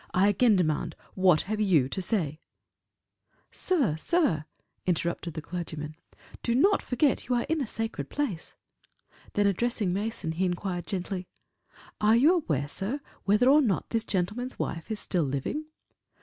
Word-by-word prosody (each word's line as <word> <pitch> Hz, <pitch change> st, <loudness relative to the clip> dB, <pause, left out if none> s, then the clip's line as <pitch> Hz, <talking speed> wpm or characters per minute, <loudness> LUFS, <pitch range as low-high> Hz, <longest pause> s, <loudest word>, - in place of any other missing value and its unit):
I 195 Hz, +3 st, +5 dB
again 215 Hz, +2 st, +4 dB
demand, 160 Hz, -2 st, 0 dB, 0.2 s
what 185 Hz, -4 st, +4 dB
have 215 Hz, +2 st, -2 dB
you 170 Hz, -11 st, +4 dB
to 190 Hz, -, -2 dB
say?" 170 Hz, -7 st, -1 dB, 1.1 s
"Sir 285 Hz, -, +1 dB
sir," 165 Hz, -, +2 dB, 0.4 s
interrupted 170 Hz, -1 st, -1 dB
the 155 Hz, -, -5 dB
clergyman, 160 Hz, -3 st, -5 dB, 0.5 s
"do 235 Hz, -, 0 dB
not 395 Hz, +10 st, +4 dB
forget 265 Hz, +2 st, +1 dB
you 250 Hz, -, +3 dB
are 240 Hz, -, 0 dB
in 320 Hz, -1 st, 0 dB
a 265 Hz, -, -2 dB
sacred 225 Hz, +1 st, -4 dB
place." 245 Hz, -, -3 dB, 0.8 s
Then 205 Hz, -, +2 dB
addressing 200 Hz, -1 st, +1 dB
Mason, 205 Hz, -4 st, -2 dB
he 175 Hz, +4 st, 0 dB
inquired 175 Hz, 0 st, -2 dB
gently, 185 Hz, -1 st, -3 dB, 0.7 s
"Are 215 Hz, +1 st, +5 dB
you 285 Hz, +9 st, +6 dB
aware, 155 Hz, -, 0 dB
sir, 200 Hz, -, -3 dB, 0.3 s
whether 210 Hz, +5 st, +4 dB
or 290 Hz, +3 st, +7 dB
not 215 Hz, -9 st, 0 dB
this 225 Hz, -1 st, +1 dB
gentleman's 210 Hz, +8 st, -2 dB
wife 165 Hz, -1 st, -4 dB
is 215 Hz, -1 st, -3 dB
still 180 Hz, -, 0 dB
living?" 140 Hz, -, -2 dB
195 Hz, 150 wpm, -28 LUFS, 170-240 Hz, 1.1 s, or